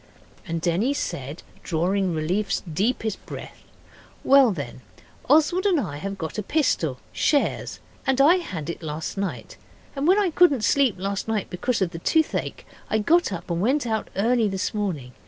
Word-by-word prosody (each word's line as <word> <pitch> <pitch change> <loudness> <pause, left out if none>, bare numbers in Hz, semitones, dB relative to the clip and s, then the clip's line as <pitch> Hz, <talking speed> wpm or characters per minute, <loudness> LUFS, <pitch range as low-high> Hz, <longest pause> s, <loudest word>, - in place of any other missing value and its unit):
And 165 0 -2
Denny 195 - +1
said, 140 - -4 0.2
drawing 180 +2 0
relief's 180 +7 -1
deepest 210 +5 -2
breath, - - -8 0.6
'Well 275 -2 +6
then, 140 -8 -6 0.5
Oswald 320 +7 +4
and 360 -6 +3
I 160 - -4
have 195 +6 -5
got 165 +3 -4
a - - 0
pistol 190 - 0 0.2
shares 290 -2 0 0.3
and 265 0 +2
I 310 +7 +6
had 175 - -5
it - - -10
last 155 0 -5
night. 195 -1 -4 0.4
And 280 +2 -1
when 375 +3 +5
I 400 -4 +2
couldn't 300 -9 +4
sleep 265 0 +3
last 195 +3 -3
night 220 -3 -2
because 225 +4 0
of 175 - -2
the 165 - -7
toothache 315 - 0 0.2
I 220 - +2
got 330 +7 +3
up 175 -1 -5
and 170 0 -1
went 265 +6 +1
out 220 -2 -2
early 230 +2 +2
this 190 0 -2
morning. 180 -12 -3
205 Hz, 170 wpm, -24 LUFS, 170-275 Hz, 0.6 s, Well